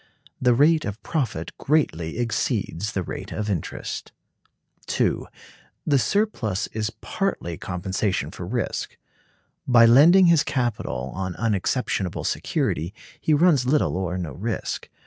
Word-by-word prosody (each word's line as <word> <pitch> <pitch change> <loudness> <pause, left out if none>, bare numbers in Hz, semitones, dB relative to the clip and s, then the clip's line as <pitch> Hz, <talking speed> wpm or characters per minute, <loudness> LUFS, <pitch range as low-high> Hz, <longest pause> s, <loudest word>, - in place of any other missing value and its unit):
The 125 -1 +4
rate 155 +4 +4
of 100 +1 -4
profit 115 - -2
greatly 85 - 0
exceeds 110 -4 -1
the 95 - -1
rate - - -7
of 105 0 -2
interest. 90 -6 -4 0.8
(2.) - - 0 0.6
The 140 -3 +3
surplus 125 - 0
is 110 -1 -1
partly 195 - -2
compensation 95 - -2
for 90 - -7
risk. 120 +3 -3 0.7
By 120 -2 +7
lending 160 +11 +7
his 170 -3 +5
capital 120 - -2
on 95 -2 -4
unexceptionable 105 -3 -1
security 85 +7 -1 0.2
he 155 - +2
runs 145 -5 +4
little 145 -6 +2
or 90 -1 -2
no 85 -5 -4
risk. 110 +10 -4
110 Hz, 125 wpm, -24 LUFS, 95-140 Hz, 0.8 s, By